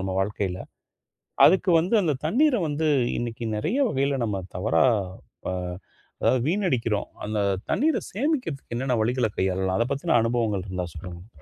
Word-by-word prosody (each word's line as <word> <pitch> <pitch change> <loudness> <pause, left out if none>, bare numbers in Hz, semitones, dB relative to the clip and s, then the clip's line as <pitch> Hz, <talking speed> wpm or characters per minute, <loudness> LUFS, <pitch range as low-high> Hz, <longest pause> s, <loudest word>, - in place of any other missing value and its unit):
நம்ம 95 0 -3
வாழ்க்கையில. 95 -2 -2 0.9
அதுக்கு 190 0 +4
வந்து 180 +8 +1
அந்தத் 150 -8 -1
தண்ணீர 260 - +3
வந்து 155 +2 -1 0.3
இன்னைக்கு 120 -1 -4
நெறைய 160 - -1
வகையில 135 0 0
நம்ம 105 -4 -2
தவறா, 105 +8 +2 0.6
அ - - -1 0.7
அதாவது 130 - +3
வீணடிக்கிறோம். 130 - 0 0.2
அந்தத் 100 -2 -1
தண்ணீர 310 +4 +2
சேமிக்கறதுக்கு 250 - -2
என்னென்ன 125 +1 0
வழிகள 120 +1 +1
கையாளலாம்? 95 0 0
அதப் 120 +4 0
பத்தின 160 +4 0
அனுபவங்கள் 115 -4 0
இருந்தா 90 -2 -3
சொல்லுங்க 85 +1 -9
ப்ரோ. 75 - -21
120 Hz, 140 wpm, -25 LUFS, 100-160 Hz, 0.9 s, அதுக்கு